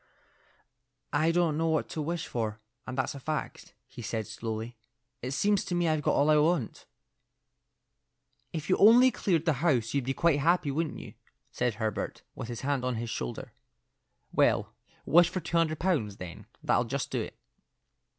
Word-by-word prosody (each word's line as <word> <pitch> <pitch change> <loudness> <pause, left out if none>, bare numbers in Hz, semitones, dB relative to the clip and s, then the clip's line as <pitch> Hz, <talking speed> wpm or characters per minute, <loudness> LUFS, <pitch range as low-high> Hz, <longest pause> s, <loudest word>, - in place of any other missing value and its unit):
"I 155 +2 +3
don't 165 -3 +1
know 165 - +1
what 160 -1 +1
to 155 - -4
wish 165 +2 -2
for, 110 -2 -3 0.3
and 130 - -5
that's 130 - 0
a 140 - -8
fact," 155 +3 -5
he - - -11
said, 110 -1 -3
slowly. 110 +2 -5 0.5
"It 125 - -3
seems 200 +9 +2
to 175 - -2
me 175 -1 +1
I've 155 -1 +1
got - - +1
all 145 +2 +4
I 150 - +5
want." 150 -5 0 1.6
"If 155 -2 -5
you - - +3
only 240 +5 +7
cleared 170 -9 0
the 160 - +3
house, 125 -10 +2
you'd 140 -3 0
be 135 +1 -1
quite 165 -4 +3
happy, 165 -1 +2
wouldn't 155 +2 -2
you?" - - -9 0.4
said 120 -3 -1
Herbert, 110 -1 -3
with - - -6
his 120 -1 -6
hand 140 -2 0
on 125 -1 -1
his 115 0 -4
shoulder. 60 -1 -5 0.8
"Well, - - +2 0.3
wish 175 +2 +6
for 185 - -3
two 170 0 -2
hundred 160 -2 +2
pounds, 140 - 0
then; 90 -2 -9 0.2
that - - +3
'll 120 - +1
just 135 +4 -3
do - - 0
it." - - -7
145 Hz, 180 wpm, -29 LUFS, 120-165 Hz, 1.6 s, only